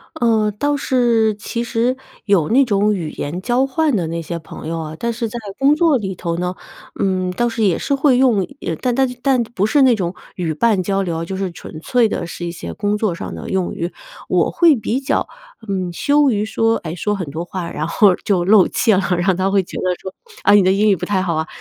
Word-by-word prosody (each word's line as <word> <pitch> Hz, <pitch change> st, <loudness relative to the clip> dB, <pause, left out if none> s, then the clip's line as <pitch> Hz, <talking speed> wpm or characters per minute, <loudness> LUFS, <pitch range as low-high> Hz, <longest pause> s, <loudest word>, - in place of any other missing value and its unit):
嗯， 220 Hz, -3 st, +2 dB
倒 290 Hz, +5 st, +1 dB
是 235 Hz, -5 st, +2 dB
其 230 Hz, +3 st, -4 dB
实 240 Hz, +2 st, 0 dB, 0.3 s
有 195 Hz, -7 st, +2 dB
那 270 Hz, +3 st, +4 dB
种 210 Hz, -2 st, +2 dB
语 165 Hz, -5 st, -4 dB
言 165 Hz, +6 st, -5 dB
交 245 Hz, +5 st, +1 dB
换 300 Hz, 0 st, +1 dB
的 175 Hz, -5 st, -1 dB
那 165 Hz, +1 st, -3 dB
些 170 Hz, +1 st, -5 dB
朋 160 Hz, -, -10 dB
友 165 Hz, 0 st, -3 dB
啊， 155 Hz, -1 st, -6 dB
但 235 Hz, 0 st, -1 dB
是 230 Hz, -1 st, -3 dB
在 240 Hz, -, -6 dB, 0.2 s
工 280 Hz, +2 st, +4 dB
作 315 Hz, -3 st, +3 dB
里 190 Hz, -5 st, -4 dB
头 170 Hz, -1 st, -3 dB
呢， 180 Hz, +1 st, -2 dB, 0.4 s
嗯， 185 Hz, -1 st, 0 dB
倒 240 Hz, +6 st, 0 dB
是 230 Hz, -1 st, -2 dB
也 185 Hz, -5 st, +3 dB
是 -, -, -2 dB
会 275 Hz, -2 st, +3 dB
用 240 Hz, -7 st, +3 dB
也 165 Hz, -, -3 dB
但 250 Hz, +7 st, -1 dB
但 265 Hz, 0 st, +3 dB
但 265 Hz, -2 st, +2 dB
不 220 Hz, -3 st, -2 dB
是 275 Hz, +5 st, +4 dB
那 255 Hz, -2 st, +6 dB
种 180 Hz, -4 st, -2 dB, 0.2 s
语 175 Hz, -3 st, -2 dB
伴 210 Hz, +4 st, +2 dB
交 195 Hz, +2 st, 0 dB
流， 165 Hz, -3 st, -3 dB
就 190 Hz, +3 st, -5 dB
是 190 Hz, -2 st, -2 dB
纯 155 Hz, -1 st, -10 dB
粹 240 Hz, +3 st, +2 dB
的 175 Hz, -, -3 dB
是 175 Hz, +1 st, -6 dB
一 170 Hz, -, -3 dB
些 85 Hz, -, -7 dB
工 205 Hz, -, -1 dB
作 210 Hz, -4 st, 0 dB
上 170 Hz, -, -6 dB
的 -, -, -7 dB
用 190 Hz, -2 st, 0 dB
语， 170 Hz, +2 st, -4 dB, 0.4 s
我 -, -, +2 dB
会 335 Hz, -4 st, +5 dB
比 235 Hz, +2 st, -2 dB
较， 270 Hz, -, -1 dB, 0.4 s
嗯， 185 Hz, -3 st, -2 dB
羞 285 Hz, +7 st, +3 dB
于 210 Hz, -2 st, 0 dB
说， 225 Hz, +1 st, +1 dB
哎， 165 Hz, 0 st, -6 dB
说 210 Hz, +4 st, -1 dB
很 180 Hz, -7 st, -5 dB
多 160 Hz, +4 st, -5 dB
话， 175 Hz, -1 st, -5 dB
然 155 Hz, +2 st, -3 dB
后 195 Hz, +1 st, +4 dB
就 185 Hz, -4 st, +2 dB
露 195 Hz, +1 st, +5 dB
怯 225 Hz, -4 st, +2 dB
了， -, -, +2 dB, 0.2 s
然 175 Hz, -, -1 dB
后 190 Hz, -, +4 dB
他 190 Hz, +2 st, 0 dB
会 200 Hz, 0 st, +3 dB
觉 -, -, -9 dB
得 -, -, -3 dB, 0.2 s
说， 190 Hz, -, -7 dB, 0.3 s
“啊， 205 Hz, -, +5 dB
你 205 Hz, -1 st, +6 dB
的 185 Hz, -, +4 dB
英 205 Hz, +2 st, +3 dB
语 200 Hz, -, +4 dB
不 180 Hz, 0 st, -5 dB
太 190 Hz, 0 st, 0 dB
好 175 Hz, -3 st, -1 dB
啊”、 160 Hz, 0 st, -2 dB
200 Hz, 260 characters per minute, -19 LUFS, 175-235 Hz, 0.4 s, 那